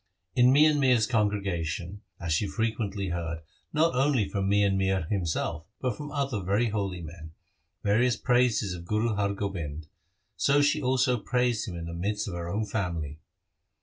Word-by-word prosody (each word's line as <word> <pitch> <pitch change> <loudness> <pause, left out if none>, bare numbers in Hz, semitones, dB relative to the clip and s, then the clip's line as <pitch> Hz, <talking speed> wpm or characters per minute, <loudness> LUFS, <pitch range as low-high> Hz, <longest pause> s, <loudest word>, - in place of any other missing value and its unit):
In 125 0 +5
Mian 150 +2 +5
Mir's 125 -5 +4
congregation, 100 -5 -1 0.2
as 85 -2 -1
she 100 +6 +1
frequently 105 -4 -2
heard, 85 -1 -3 0.3
not 160 +1 +2
only 130 -5 +2
from 100 -2 -1
Mian 100 -1 +3
Mir 95 -1 +1
himself 85 -3 -1
but 125 -4 -1
from 150 0 -7
other 140 -7 -1
very 100 +6 +1
holy 100 -4 -2
men, 80 0 -10 0.5
various 120 +4 +3
praises 120 -6 +2
of 85 -1 -8
Guru 110 +4 0
Har 100 -1 0
Gobind, 85 -7 -4 0.5
so 140 +1 +3
she 145 +1 +3
also 130 -2 +2
praised 120 -2 0
him 90 - -6
in 85 -1 -5
the 85 - -6
midst 105 +5 -2
of 100 - -4
her 85 0 -4
own 105 +4 -1
family. 85 -8 -3
100 Hz, 165 wpm, -28 LUFS, 85-125 Hz, 0.5 s, In